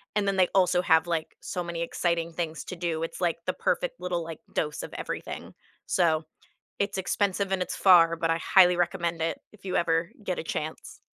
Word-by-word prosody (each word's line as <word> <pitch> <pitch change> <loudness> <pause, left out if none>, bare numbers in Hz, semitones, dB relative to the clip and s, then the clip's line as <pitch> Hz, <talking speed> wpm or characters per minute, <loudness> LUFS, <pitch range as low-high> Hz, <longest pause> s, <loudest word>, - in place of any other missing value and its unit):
and 205 -1 +1
then 195 - +1
they 185 -1 +5
also 180 -2 +4
have, 160 -1 +4
like, 165 -2 -2
so 180 - -3
many 170 -1 -4
exciting 170 0 -1
things 165 -1 -3
to 185 - -6
do; 165 -2 -2
it's, 165 - -5
like, 170 -2 +1
the - - 0
perfect - - -1
little, 180 -2 -2
like, 165 -1 -7
dose 150 -2 -2
of - - -8
everything. - - -6 0.3
So, 160 -3 +2 0.5
it's 200 -1 -1
expensive 195 0 0
and 185 -1 +1
it's - - -4
far, 170 -3 +6
but 165 0 0
I 165 - +2
highly 180 +1 +5
recommend 170 -1 -1
it 165 - -1
if 210 - -20
you 185 - -1
ever 165 +1 +1
get 185 - -2
a - - -4
chance. 155 0 -5
170 Hz, 205 wpm, -27 LUFS, 165-185 Hz, 0.5 s, far